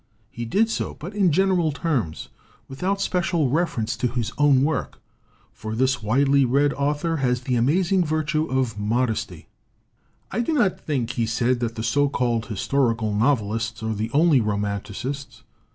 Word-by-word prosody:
He 120 - -5
did 205 - +2
so, - - -3
but 175 +7 -8
in 195 -4 +3
gen 190 +5 +3
eral 175 -4 +2
terms, 135 - -2 0.4
without 185 +9 -2
special 175 -6 0
reference 145 -8 0
to 125 - 0
his 120 0 -3
own 145 -3 +4
work. 145 -5 -2 0.5
For 110 0 -6
this 130 +1 +1
widely 135 +5 +3
read 140 +3 +2
author 145 +4 -1
has 125 -3 0
the 130 0 -2
amaz 160 +11 +2
ing 190 -2 +4
virtue 155 0 0
of 130 -7 -1
modesty. 110 +2 -1 0.8
"I 210 - -2
do 240 +7 0
not 235 -11 +2
think," 130 -6 -2
he 115 -2 -1
said, 120 +2 +1
"that 115 -1 -2
the 110 - -4
so 140 +5 +2
called 120 -4 -1
historical 115 -1 0
novelists 110 -1 0
are 110 0 -1
the 110 +2 -3
only 150 -2 +4
romanticists. 105 +6 -4
130 Hz, 165 wpm, -23 LUFS, 115-155 Hz, 0.8 s, own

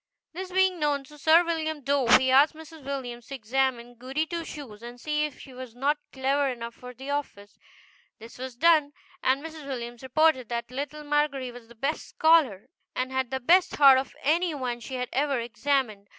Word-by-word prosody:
This 370 +2 -6
being 375 -1 +2
known 290 -2 0
to 295 +2 -15
Sir 320 +4 +6
William 315 -3 -2
Dove, 275 -3 +5
he 260 0 +1
asked 280 +4 +5
Mrs. 320 -1 -12
Williams 245 -3 -5
to 275 - -6
examine 245 0 -1
Goody 260 +6 -3
Two 335 +1 -4
Shoes 265 -10 -9
and 240 +1 -10
see 300 +2 0
if 300 - -7
she 265 - -12
was 250 -2 -9
not 285 +4 0
clever 275 +1 +1
enough 235 -2 -6
for 250 +1 -11
the 265 +3 -6
office. 205 -8 -5 0.6
This 230 +2 -13
was 260 -1 -6
done, 305 0 +4 0.3
and 265 +2 +1
Mrs. 315 -3 -9
Williams 240 -3 -6
reported 260 -1 +2
that 235 0 -4
little 290 +3 -5
Margery 290 -3 0
was 240 -1 -13
the 235 - -16
best 275 +7 -3
scholar, 310 - +3 0.3
and 255 +1 -2
had 260 -2 -1
the 265 - -2
best 345 +8 +4
heart 275 -2 +7
of 265 - -6
any 330 +3 +2
one 250 -3 -3
she 260 +3 -7
had 250 -1 -3
ever 275 -1 +1
examined. 235 -3 -1
270 Hz, 195 wpm, -27 LUFS, 245-300 Hz, 0.6 s, heart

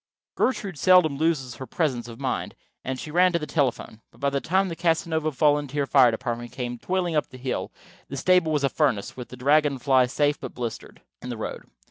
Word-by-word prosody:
Gertrude 200 - -1
seldom 180 -6 +5
loses 140 -5 -1
her 130 - -7
presence 125 -4 -1
of 115 -1 -10
mind, - - -3 0.3
and 130 0 -4
she 150 - -7
ran 180 +3 +4
to - - +3
the 155 - -4
telephone. 130 -7 -1
But - - -23
by 140 0 0
the 140 0 -1
time 190 +3 +1
the 170 - -5
Casanova 160 -2 0
volunteer 145 0 +1
fire 130 -2 +5
department 120 +1 -4
came 120 -2 -5
toiling 180 0 -1
up 150 - +1
the 130 - -11
hill 130 0 -3 0.4
the 140 - -6
stable 180 +2 +3
was 150 -2 0
a 140 - +3
furnace, 130 -11 0
with 125 -2 -8
the 125 - -10
Dragon 145 +2 +3
Fly 130 -1 +3
safe 145 +3 +1
but - - -8
blistered, 120 -3 -6 0.2
in 125 - -7
the 120 - -4
road. 110 - -6
140 Hz, 210 wpm, -25 LUFS, 125-160 Hz, 0.4 s, seldom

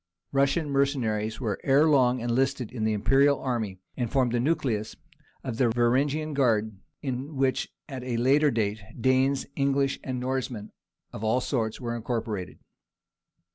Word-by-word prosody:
Russian 140 +3 +1
mercenaries 120 -6 0
were 110 -6 -2
ere 140 +3 +4
long 130 -4 +3
enlisted 125 0 0
in 115 -3 -3
the 110 - +2
imperial 135 +7 +3
army, 110 -7 -2 0.2
and 120 -3 -2
formed 130 -4 +2
the 120 - +1
nucleus 120 -6 -1 0.5
of 125 -4 -4
the 125 -2 +3
"Varangian 135 +6 +1
guard," 110 -6 +1 0.3
in 135 +2 -4
which 135 -1 0 0.2
at 130 -4 -6
a 125 -2 -2
later 140 +5 +4
day, 110 -4 -1 0.2
Danes, 130 +2 +2
English, 140 0 +1
and 130 -2 -3
Norsemen 125 -4 -3 0.4
of 105 - -7
all 110 +3 +2
sorts 115 -5 -2
were 120 -2 -3
incorporated. 115 -5 -3
125 Hz, 145 wpm, -27 LUFS, 115-135 Hz, 0.5 s, ere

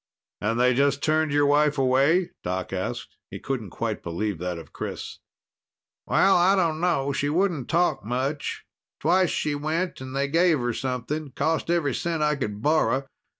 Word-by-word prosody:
"And 115 +3 0
they 125 +1 +4
just 140 +2 +1
turned 155 -1 +2
your 145 0 +3
wife 145 +1 +3
away?" 140 +7 +3
Doc 90 +1 -3
asked. 95 -1 -4
He - - -7
couldn't 125 -7 -4
quite - - -3
believe 90 +2 -3
that 90 0 -3
of 80 - -11
Chris. - - -6 0.9
"Well, 195 0 +4
I 180 +3 +5
dunno. 165 -5 +1
She 145 +1 -1
wouldn't 170 -5 0
talk 170 - +1
much. 130 +6 -3 0.3
Twice 180 +3 +3
she 150 - -1
went 155 +3 -2
and 130 0 -7
they 140 +1 +1
gave 165 +2 +3
her 120 -2 -1
something. 135 +4 -3
Cost 160 +1 0
every 165 -6 +1
cent 165 +1 -1
I 150 0 +2
could 105 -6 -4
borrow. 150 -3 +2
145 Hz, 165 wpm, -25 LUFS, 125-160 Hz, 0.9 s, I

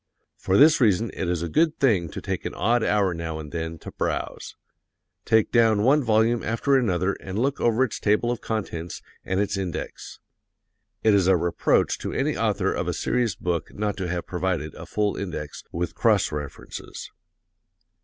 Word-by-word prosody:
For 95 +1 +1
this 150 0 +6
reason 110 -1 +3
it 90 - -3
is 85 -1 -1
a - - -2
good 160 - +2
thing 100 - +2
to - - -7
take - - -3
an - - -5
odd 120 +1 +2
hour 100 -3 +2
now 80 -1 -4
and 75 -2 -8
then 80 -1 -4
to - - -6
browse. - - -3 0.7
Take 110 -1 +3
down 110 -3 +4
one 140 +4 +4
volume 115 +1 +2
after 115 +5 +1
another 100 -7 +1
and 95 +1 -6
look 135 +4 0
over 120 +2 +3
its 130 - -3
table 105 +3 +2
of 120 - -4
contents 90 -6 -4 0.2
and 95 0 -1
its 100 -1 0
index. 95 -3 -5 0.8
(It 110 - +5
is 95 -3 +3
a 95 -1 +5
reproach 85 0 +1
to - - -4
any - - 0
author - - 0
of - - -2
a - - 0
serious 120 -4 0
book 85 -2 -3
not 105 -1 -1
to 95 -2 -3
have 85 0 -3
provided 90 -4 -2
a - - -10
full 105 -1 0
index, 85 -7 -5
with 85 +1 -3
cross 105 -5 +2
references.) 75 -3 -7
100 Hz, 185 wpm, -25 LUFS, 85-115 Hz, 0.8 s, this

